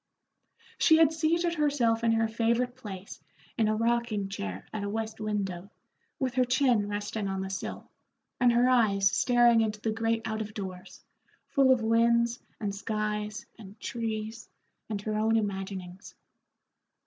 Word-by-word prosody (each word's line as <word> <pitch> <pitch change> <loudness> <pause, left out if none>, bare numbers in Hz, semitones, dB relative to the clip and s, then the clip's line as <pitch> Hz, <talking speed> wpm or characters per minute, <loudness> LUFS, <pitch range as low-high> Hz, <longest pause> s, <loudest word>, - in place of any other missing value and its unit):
She 320 - +6
had 320 -1 +5
seated 335 +2 +1
herself 270 -8 +1
in 230 -1 +3
her 225 0 +2
favorite 235 +2 0
place 200 -6 -9 0.3
in 225 -3 +2
a 215 - +1
rocking 230 -3 0
chair 95 - -5
at 215 - -3
a 200 - -2
west 220 +1 -4
window, 200 -3 -3 0.5
with 260 -2 -1
her 255 0 +3
chin 250 -4 +2
resting 205 0 -3
on 195 0 -2
the 190 0 -4
sill, 190 - -5 0.5
and 245 -1 +5
her 240 +1 +4
eyes 200 -6 +3
staring 240 +1 +4
into 215 -1 -1
the 220 +1 -1
great 225 +1 0
out 220 0 -2
of 215 0 -7
doors, 185 -3 -8 0.4
full 270 -2 +3
of 250 -3 +3
winds 235 +1 +3 0.2
and 205 -3 -2
skies 210 +1 -3
and 205 0 -12
trees 225 -1 -4 0.4
and 210 -2 -2
her 215 0 -2
own 225 +1 +3
imaginings. 195 -3 -5
220 Hz, 155 wpm, -29 LUFS, 205-235 Hz, 0.5 s, She